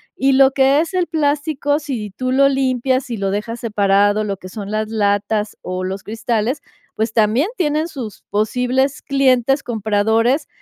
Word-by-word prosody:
Y 270 0 +2
lo 265 0 +6
que 270 +2 +3
es 335 +4 -2
el 360 -1 +1
plástico, 290 -1 0
si 240 -9 -5
tú 255 +5 -3
lo 275 +1 +4
limpias, 260 -1 0
si 235 -3 -5
lo 195 -1 -1
dejas 225 +3 -3
separado, 205 -1 +2
lo 200 -2 -3
que 185 0 -11
son 200 0 -7
las 215 0 -2
latas 210 0 0
o 185 0 -4
los 190 +1 -4
cristales, 230 +4 -2 0.3
pues, 220 +1 -1
también 230 - +2
tienen 310 -1 0
sus 250 -10 -8
posibles 250 +6 0
clientes 270 0 +2
compradores 225 +5 +1
240 Hz, 165 wpm, -19 LUFS, 210-275 Hz, 0.3 s, lo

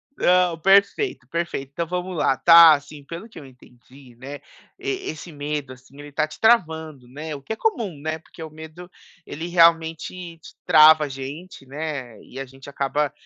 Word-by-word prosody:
Não, 180 -2 +2
perfeito, 200 - +2
perfeito. 170 -5 -4
Então 170 +1 -3
vamos 180 +1 -4
lá, 135 -4 +1
tá? 165 -2 +8
Assim, 145 0 -6
pelo 170 +9 -9
que 220 - -13
eu 140 - -12
entendi, 125 0 -19
né, 135 +3 -9 0.4
esse 380 - -5
medo 145 -2 -5
assim, 130 +2 -19
ele 145 0 -10
está 155 +2 -1
te 155 0 -13
travando, 160 - +1
né, 150 +4 -7
o 140 - -10
que 180 - -10
é - - -6
comum, 220 - -2
né, 155 +1 -4
porque 160 - -13
o 160 - -8
medo, 160 +3 -12 0.4
ele 160 +4 -7
realmente 165 0 +1
te 160 - -15
trava 155 0 +7
a - - -7
gente, 135 +4 -9
né, 140 -4 -6
e 130 - -11
a 135 - -5
gente 135 +2 -14
acaba 140 +1 -1
155 Hz, 180 wpm, -22 LUFS, 140-170 Hz, 0.4 s, tá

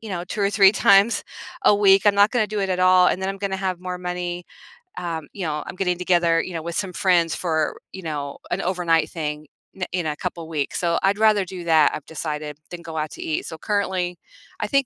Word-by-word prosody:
you 220 - -9
know, 175 -1 -3
2 205 - -5
or 200 - +2
3 195 -2 +6
times 200 +3 +4 0.4
a 210 - +6
week, 195 -1 +5
I'm 205 - +5
not 205 +1 +5
gonna 240 -4 +1
do 210 0 -3
it 195 - -1
at 185 -1 -1
all, 185 0 +6
and 185 - -1
then 190 - -1
I'm 195 0 -4
gonna 195 -1 -2
have 185 -2 -3
more 180 -1 -5
money, 180 0 -4 0.5
um 165 -3 -4
you 195 - -6
know, 150 -1 -2
I'm - - -7
getting 180 -2 0
together, 175 -2 +2
you 185 - -7
know, 165 - -3
with 170 0 -5
some 190 -3 -2
friends 175 -3 +2
for, 160 -3 -1 0.2
you 190 -1 -8
know, 145 -3 -4
an - - 0
overnight 175 -3 +1
thing 150 -2 -5 0.3
in 180 -2 -4
in 180 -3 -1
a 150 - -2
couple 170 -3 -5
weeks, 150 -3 -2
so 170 -1 +1
I'd 195 +1 +3
rather 215 -3 +4
do 180 -1 -8
that, 160 -3 +5
I've 150 - -8
decided, 150 -2 -5
than 175 -1 -7
go 160 -1 -8
out 155 0 -2
to - - -9
eat, 155 - -2
so 160 - -7
currently, 185 -2 -1 0.4
I 210 - -1
think 275 +3 +2
180 Hz, 240 wpm, -23 LUFS, 165-195 Hz, 0.5 s, 3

